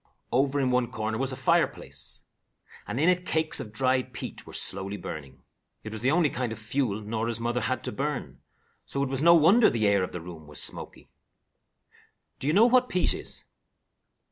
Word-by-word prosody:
Over 135 +3 +2
in 130 -2 +1
one 125 -1 +1
corner 110 -2 -3
was 135 0 0
a - - -4
fireplace, 130 -1 0 0.6
and 120 - -3
in 160 - +3
it 180 0 +3
cakes 160 -3 0
of 105 - -7
dried 130 +3 0
peat - - -7
were - - -11
slowly 95 +2 +2
burning. 75 -8 -8 0.4
It 110 - -7
was 110 - -6
the 125 - +2
only 160 0 +3
kind 125 -2 -2
of 110 - -5
fuel 110 -1 -2
Norah's 110 +2 -2
mother 120 +1 -1
had 130 -1 -2
to - - -3
burn, 145 -1 -4 0.4
so 140 - -1
it 140 - -2
was 135 0 -2
no 170 +2 +7
wonder 185 +9 +6
the 110 -2 0
air 100 -1 +3
of 90 - -4
the 90 - -5
room 80 -2 -10
was 75 -1 -6
smoky. - - -5 1.3
Do 135 - -3
you 150 - +2
know 210 +5 +6
what 250 +1 +4
peat 180 - +2
is? - - -1
125 Hz, 195 wpm, -27 LUFS, 110-145 Hz, 1.3 s, no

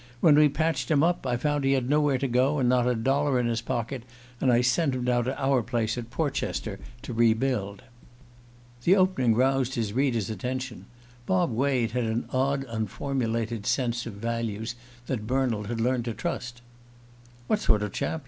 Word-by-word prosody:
When 155 +4 +6
we'd 150 -1 +5
patched 155 -6 0
him 150 -1 +3
up 175 -5 +1
I 120 -1 +1
found 145 +3 0
he 135 0 +3
had 130 -2 0
nowhere 145 -1 +3
to 135 +2 -1
go, 130 +4 +2
and 130 -3 +2
not 125 0 +3
a 125 - +2
dollar 135 +3 +1
in 120 - 0
his 115 -1 0
pocket, 120 +1 -3 0.4
and 130 - +3
I 120 0 +4
sent 130 +3 +2
him 125 -1 -3
down 120 -1 +1
to 130 +2 -3
our 135 -2 +2
place 115 -1 -1
at 120 -1 -6
Portchester 130 -7 -2 0.2
to 130 - -5
re 115 -1 +4
build." 110 -5 -2 1.0
The 185 - +5
opening 185 - +3
roused 130 +1 +2
his 110 -3 -1
hearer's 120 -4 0
attention. 125 -4 -5 0.4
Bob 95 +6 +2
Wade 125 -1 +1
had 125 0 -1
an 110 +1 -1
odd 135 +1 +1
unformulated 115 0 -2
sense 120 -2 0
of 115 - -6
values 115 +1 -3 0.3
that 115 -5 -3
Bernald 125 -5 0
had 115 +1 -3
learned 120 +1 0
to 115 -3 -3
trust. 120 0 -4 0.8
"What 215 - +1
sort 105 - +2
of 105 - -3
chap? 160 - -2
125 Hz, 185 wpm, -27 LUFS, 115-135 Hz, 1.0 s, When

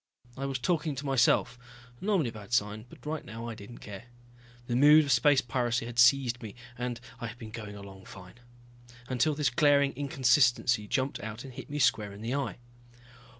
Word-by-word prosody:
I 135 +1 -4
was 135 -1 -2
talking 150 +2 -1
to 140 +3 -6
myself, 125 -2 +2 0.4
normally 190 - +1
a - - -18
bad 105 +1 -10
sign, 110 0 0
but - - -16
right 155 0 -3
now 115 +1 -8
I 115 - -4
didn't 110 +2 -11
care. 105 +2 -9 0.6
The 120 - -2
mood 150 +4 +7
of 140 - -1
space 135 +2 +4
piracy 120 -1 -1
had 120 0 -5
seized 125 -1 +4
me 110 -4 -8 0.2
and 125 -1 -4 0.2
I 120 - -4
had 115 +2 -9
been 110 -2 -10
going 105 -3 -8
along 95 -1 -11
fine. 95 +4 -13 0.7
Until 140 +4 +1
this 145 -5 +1
glaring 140 +1 +3
inconsistency 125 -4 +2
jumped 130 +5 -1
out 110 +2 -7
and 135 -2 -10
hit 130 +4 -9
me 145 - -4
square 110 -7 +1
in 100 - -11
the 115 +3 -3
eye. 140 -1 -2
125 Hz, 195 wpm, -29 LUFS, 115-140 Hz, 0.7 s, mood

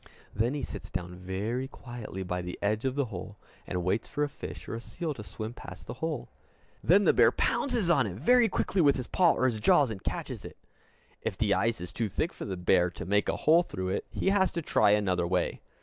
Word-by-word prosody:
Then 115 +6 0
he 145 - -3
sits - - -6
down 90 0 -4
very 100 +8 -3
quietly 120 -8 -7
by 90 0 -2
the 90 0 -6
edge 105 +4 0
of 130 0 0
the 140 -1 +1
hole, 95 +3 -7 0.3
and 90 -1 -2
waits 95 +5 0
for 150 - -1
a 145 - 0
fish - - -8
or - - -5
a 115 - -4
seal 165 +4 -4
to 110 - -8
swim 110 +2 -6
past - - -10
the - - -6
hole. 160 -5 -2 0.6
Then 195 +5 +5
the - - +5
bear - - +6
pounces 245 - +1
on 135 -8 +3
it 90 - -5
very 235 - +4
quickly 190 - 0
with 145 -3 +5
his 130 - -3
paw 175 +4 +4
or 130 - 0
his 115 -4 -1
jaws, 130 +4 +4
and 95 -3 -7
catches - - -4
it. - - -10 0.6
If - - -3
the 105 -3 +2
ice 115 +3 +1
is 90 0 -7
too 115 -1 -1
thick 135 - -1
for - - -7
the 95 -2 -4
bear 90 0 +3
to - - -8
make 105 +2 +2
a - - 0
hole 165 +3 +5
through 95 - -4
it, 95 - -2
he - - 0
has 190 -2 +3
to 170 - -3
try 105 - +3
another 95 -4 +2
way. 90 0 0
110 Hz, 240 wpm, -29 LUFS, 95-145 Hz, 0.6 s, bear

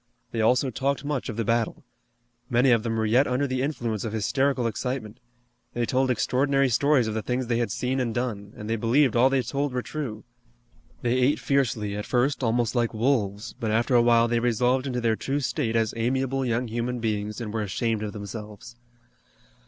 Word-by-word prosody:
They 115 - -1
also 125 +4 +3
talked 135 +4 -1
much 145 -4 -2
of 110 - -5
the 115 - -1
battle. 115 0 0 0.7
Many 125 +2 +4
of 115 -2 +4
them 115 0 -2
were 110 - +1
yet 125 +6 +3
under 130 +3 0
the 130 -1 -1
influence 120 -7 -2
of 110 - -4
hysterical 130 +4 +1
excitement. 115 0 -3 0.6
They 120 0 0
told 130 +2 +1
extraordinary 135 +3 +2
stories 140 +2 +3
of 110 - -2
the 110 - -2
things 125 +3 -2
they 120 0 0
had 120 - -1
seen 130 +1 -1
and 125 -3 0
done, 110 -4 -3
and 105 - -7
they 115 +1 0
believed 120 +3 +3
all 125 +3 +5
they 135 -1 +1
told 140 0 -2
were 125 -1 -2
true. 125 -8 -5 0.8
They 120 +1 +1
ate 130 +4 +3
fiercely, 120 -7 0
at 105 - -5
first 130 +3 +1
almost 120 0 +1
like 120 -2 0
wolves, 110 -3 0
but 115 -4 -2
after 115 +4 +1
a 120 - +6
while 115 0 +4
they 120 0 +1
resolved 125 +3 +1
into 125 -2 -2
their 115 -1 +2
true 135 +5 -2
state 120 -3 -1
as 115 -1 +1
amiable 130 +3 0
young 120 0 0
human 120 +2 -2
beings 105 -1 -2
and 110 -3 -5
were 110 - -1
ashamed 110 +2 -1
of 105 -1 -3
themselves. 105 +2 -8
120 Hz, 200 wpm, -26 LUFS, 110-130 Hz, 0.8 s, a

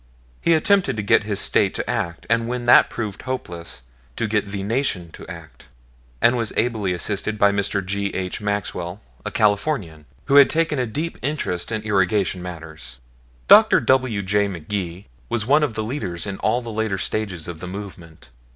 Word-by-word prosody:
He 170 - +4
attempted 180 - +2
to 105 - -2
get 105 +1 +3
his 105 -2 -1
State - - +2
to - - -3
act, 85 0 -3
and 115 0 +1
when 125 0 -3
that 120 - +7
proved 105 -5 -5
hopeless 85 - -6 0.3
to - - -1
get 105 -1 0
the 100 -1 -4
Nation 105 -7 -1
to - - -11
act; - - -11 0.6
and 120 - +5
was 115 -3 -1
ably 110 -5 0
assisted 100 +4 -2
by 100 -1 +5
Mr. 100 -1 -1
G. 100 +1 -1
H. 95 +1 -3
Maxwell, 100 -3 -3 0.2
a - - -3
Californian, 100 - 0 0.2
who 140 - +4
had 140 - +8
taken 160 -3 +1
a 125 - 0
deep 155 +9 -4
interest 125 - -2
in 110 -1 -2
irrigation 95 -2 +1
matters. 80 -8 -8 0.5
Dr. - - +8
W. 130 -6 +1
J. 100 +2 +2
McGee 90 0 -5 0.2
was 110 -3 0
one 145 +5 +4
of 145 -7 0
the 110 - -2
leaders 105 - -4
in 100 -1 -4
all 125 +1 +1
the 115 - -6
later 110 -2 -1
stages 95 -5 -3
of 85 -2 -7
the 90 - -7
movement. 90 -6 -9
105 Hz, 180 wpm, -22 LUFS, 90-120 Hz, 0.6 s, had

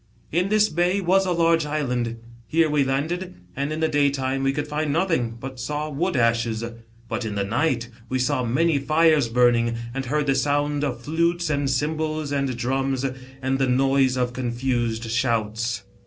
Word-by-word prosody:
" - - -35
In 180 +4 +1
this 215 0 +4
bay 175 +2 +1
was 190 +1 +2
a - - +1
large 165 -1 +3
island. 125 -6 -2 0.3
Here 160 -1 +2
we 150 -2 +3
landed, 165 +8 -2 0.2
and 140 +2 -2
in 155 +1 -3
the 160 - +3
daytime 140 -3 +1
we 135 0 +2
could 145 +2 -3
find 150 0 -1
nothing, 150 -9 0
but 130 0 -7
saw 150 +4 -3
wood 170 +5 -1
ashes; 115 -1 +1 0.4
but 115 +1 -3
in 110 -2 -4
the 100 - 0
night 120 +3 0 0.2
we 130 - 0
saw 130 +1 0
many 145 +6 +2
fires 155 -2 +3
burning, 120 -1 +3 0.2
and 135 0 -3
heard 150 +3 0
the 135 - +2
sound 145 +1 0
of 125 -4 -2
flutes, 170 +4 0
and 145 -2 0
cymbals, 155 +2 -1
and 140 -3 -1
drums, 135 +2 -1 0.4
and 130 +1 0
the 135 -1 +2
noise 135 0 +3
of 125 -1 0
confused 120 -2 -1
shouts. 115 -1 -1
135 Hz, 180 wpm, -24 LUFS, 125-155 Hz, 0.4 s, this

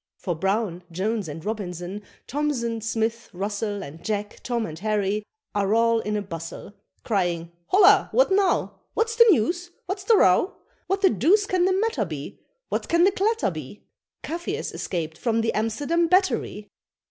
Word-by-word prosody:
For 180 - -2
Brown, 190 +1 -1
Jones, 200 +3 -1
and 155 +1 -7
Robinson, 195 -2 -4 0.2
Thomson, 250 -6 -1
Smith, 225 +1 -2
Russel, 205 +2 -3
And 155 +4 -10
Jack, 210 -1 -3
Tom, 235 -3 -1
and 160 -3 -7
Harry, 210 0 0 0.3
are 205 +1 +1
all 230 0 +3
in 210 -1 -2
a 205 - -2
bustle, 165 +1 -8 0.3
Crying, 175 -5 -1 0.2
"Holloa! 395 +1 +6
what - - +3
now? 385 -1 +1 0.2
What's 450 0 +1
the 465 0 +7
news? 350 - +2 0.2
what's 380 +1 -4
the 450 0 +5
row? 345 - +4 0.3
What 390 +1 0
the 380 - +6
deuce 350 - +3
can 370 -2 +1
the 375 - +3
matter 390 - +1
be? 150 -4 -7 0.3
What - - -2
can 340 +1 +4
the 385 - +5
clatter 435 +4 +1
be?" - - -9 0.4
Kafirs 345 +7 -4
escaped 160 -3 -4
from 230 -2 +1
the 225 - 0
Amsterdam 285 +11 0
Battery! 275 - +1
225 Hz, 160 wpm, -25 LUFS, -, 0.4 s, the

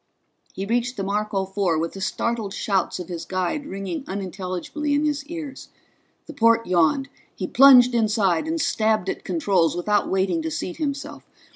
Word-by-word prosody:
He 195 - -4
reached 240 +3 -1
the 195 - -2
Marco 200 0 -1
Four 190 -4 0
with 165 +1 -2
the 195 - -8
startled 220 0 -2
shouts 195 -4 0
of 180 -2 -7
his 170 -2 -5
guide 185 +11 -2
ringing 195 - -5
unintelligibly 190 - -3
in 295 +1 +1
his 290 -2 -1
ears. 310 -5 -7 0.6
The - - -9
port 230 0 +3
yawned; 180 - +2 0.3
he - - -4
plunged 250 -2 +7
inside 215 - +1
and 325 +1 -1
stabbed 215 - +1
at - - -4
controls 175 -1 +1
without 205 +4 +1
waiting 190 -3 +1
to 160 - -3
seat 160 +3 -4
himself. 280 -2 -4
200 Hz, 165 wpm, -23 LUFS, 185-250 Hz, 0.6 s, plunged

